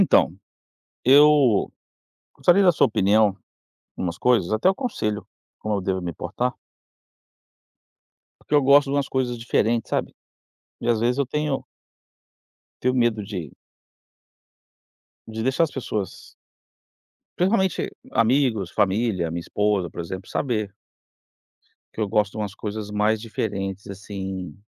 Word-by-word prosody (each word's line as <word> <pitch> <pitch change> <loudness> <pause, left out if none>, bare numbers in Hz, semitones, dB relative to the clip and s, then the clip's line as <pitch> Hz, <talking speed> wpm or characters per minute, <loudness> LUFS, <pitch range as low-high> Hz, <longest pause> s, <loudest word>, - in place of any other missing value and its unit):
Então, - - +4 0.7
eu 140 -4 +5 0.6
gostaria 185 +3 +4
da 180 - +6
sua 150 - +3
opinião 105 -1 +3 0.6
numas 85 -1 -3
coisas, 115 -8 +2
até 110 +12 +3
um - - +3
conselho, 105 - -3 0.3
como 110 -1 -2
eu 100 - -1
devo 95 0 -1
me 85 -1 -4
portar. 120 +11 -2 1.9
Porque 150 - -1
eu 145 - +4
gosto 140 +2 +6
de - - 0
umas 140 -1 0
coisas 125 -2 -1
diferentes, 115 0 0
sabe? - - -2 0.7
E - - -3
às 115 -2 +3
vezes 120 +3 +1
eu 140 - +1
tenho 150 +1 -2 1.2
tenho 125 +1 +1
medo 120 -3 +2
de 90 - -6 1.8
de 110 0 -5
deixar 130 +6 +2
as 160 - -1
pessoas 110 -7 -5 1.0
principalmente 190 0 +1 0.2
amigos, 115 - +2
família, 95 -4 +1
minha 85 - -3
esposa, 105 -1 0
por - - -6
exemplo, 95 +2 -7
saber 110 -7 -1 1.2
que - - -9
eu 105 - +1
gosto 105 0 +1
de - - -8
umas 105 -2 -4
coisas 105 -1 -5
mais 105 +1 +1
diferentes, 100 -4 -4
assim, 95 -4 -6
110 Hz, 130 wpm, -23 LUFS, 100-130 Hz, 1.9 s, da